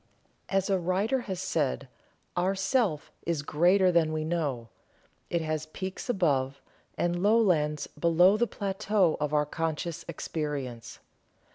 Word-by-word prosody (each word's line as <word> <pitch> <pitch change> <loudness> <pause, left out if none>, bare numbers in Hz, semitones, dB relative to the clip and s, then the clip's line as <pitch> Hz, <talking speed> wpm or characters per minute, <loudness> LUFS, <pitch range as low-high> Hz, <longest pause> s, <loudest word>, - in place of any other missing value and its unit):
As 195 -1 +1
a 195 -2 +2
writer 190 +9 +1
has 185 -2 -2
said 145 -7 -1 0.5
"Our 185 +2 +1
Self 195 - 0
is 165 -4 -2
greater 180 +5 +4
than 165 -2 +3
we 155 0 -2
know; 145 -9 -2 0.6
it 170 - 0
has 155 -1 -2
peaks 190 +8 -6
above, 140 - +1 0.4
and 175 0 0
lowlands 180 -9 +3
below 175 +4 +4
the 240 +2 +1
plateau 195 -3 +1
of 150 -1 -1
our 150 -1 +2
conscious 165 +2 -3
experience." 145 -7 -4
170 Hz, 130 wpm, -28 LUFS, 150-190 Hz, 0.6 s, greater